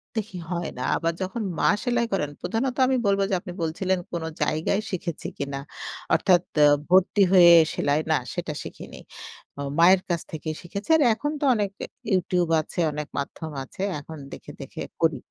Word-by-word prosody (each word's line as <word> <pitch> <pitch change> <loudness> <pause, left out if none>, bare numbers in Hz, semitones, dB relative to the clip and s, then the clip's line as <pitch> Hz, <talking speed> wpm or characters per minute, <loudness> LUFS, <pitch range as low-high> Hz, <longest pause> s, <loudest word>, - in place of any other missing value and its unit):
দেখি 210 -4 -3
হয় 175 -1 -2
না। 125 - -3
আবার 165 0 0
যখন 190 +5 -3 0.2
মা - - +4
সেলাই 240 -2 +1
করেন 150 -6 -1
প্রধানত 250 +3 -1
আমি 260 -1 +2
বলব 200 0 +3
যে, - - -1
আপনি 180 - -8
বলছিলেন, 185 +3 0
কোন 170 -2 -3 0.2
জায়গায় 160 +7 0
শিখেছি 170 -3 -4
কিনা। 140 -1 -4 0.5
অর্থাৎ 180 -2 +4
তে 150 - +5 0.3
ভর্তি 190 +3 +4
হয়ে 175 -2 +8 0.2
সেলাই, 145 +1 +1
না - - +4 0.2
সেটা 175 -4 -3
শিখিনি। - - -10 0.6
অ - - -2 0.2
মায়ের 185 +2 +7
কাছ 170 -1 0
থেকেই 155 0 -4
শিখেছি। 200 - -7
আর - - +1
এখন 295 +7 -3
তো - - +1
অনেক 205 -2 0
অ্যা - - -5 0.3
YouTube 180 -2 +1
আছে, 165 - -8
অনেক 150 0 -5
মাধ্যম 155 +3 -4
আছে 160 - -10 0.2
এখন 160 +2 -10
দেখে, - - -9
দেখে - - -8 0.2
করি। - - +3
175 Hz, 175 wpm, -25 LUFS, 160-200 Hz, 0.6 s, হয়ে